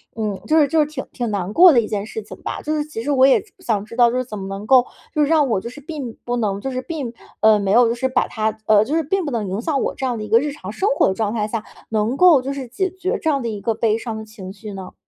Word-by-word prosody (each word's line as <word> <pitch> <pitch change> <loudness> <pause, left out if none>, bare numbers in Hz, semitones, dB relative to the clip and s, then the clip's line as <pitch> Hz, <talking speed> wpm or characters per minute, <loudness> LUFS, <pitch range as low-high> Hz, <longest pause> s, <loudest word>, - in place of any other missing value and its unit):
嗯， 210 -3 -3
就 315 - +3
是 295 - +4
就 320 +2 +1
是 300 - +4
挺 295 -3 -6
挺 240 -2 -3
难 195 -2 -2
过 355 +5 +8
的 255 - +5
一 215 - -5
件 205 -2 -2
事 220 - -6
情 210 - -10
吧。 - - -4
就 310 +1 -1
是 300 - 0
其 300 -7 -6
实 290 - -1
我 265 -2 +5
也 270 - +5
是， 420 - -26
想 220 - -1
知 230 - -11
道， 240 -1 +5
就 250 - -1
是 255 - -1
怎 215 -3 -7
么 190 - -6
能 195 +1 -6
够， 255 +2 +5 0.3
就 305 - +1
是 290 - +3
让 305 -2 +3
我 220 - +1
就 235 - -6
是 255 - -11
并 280 -6 -6
不 245 0 -2
能 205 -4 -1
就 270 - -3
是 255 0 -3
并 275 -5 -5 0.3
呃， 215 -1 +6
没 195 -1 -1
有 240 +3 +6
就 230 - -1
是 260 +2 0
把 260 - +1
它， 220 -1 -2
呃， 215 -1 +6
就 285 +7 -1
是 325 - +1
并 370 +4 -1
不 290 - -3
能 225 -4 -2
影 195 +4 -3
响 285 0 0
我 - - -1
这 265 - -3
样 245 -2 -1
的 215 - -5
一 210 - -7
个 225 +2 +6
日 290 +3 -2
常 190 -9 -8
生 380 - -1
活 - - +3
的 - - 0
状 210 +1 -2
态 215 -3 0
下， 220 0 -3 0.3
能 220 +3 0
够 345 -6 +6
就 270 +2 -4
是 270 -2 -6
解 380 +10 -1
决 375 +1 -2
这 320 - +1
样 280 -3 +1
的 235 - -3
一 210 -2 -5
个 225 +3 0
悲 220 -1 +1
伤 225 -1 -5
的 220 - -6
情 210 -4 -10
绪 215 0 -9
呢？ 190 -1 -8
235 Hz, 355 characters per minute, -20 LUFS, 215-290 Hz, 0.3 s, 过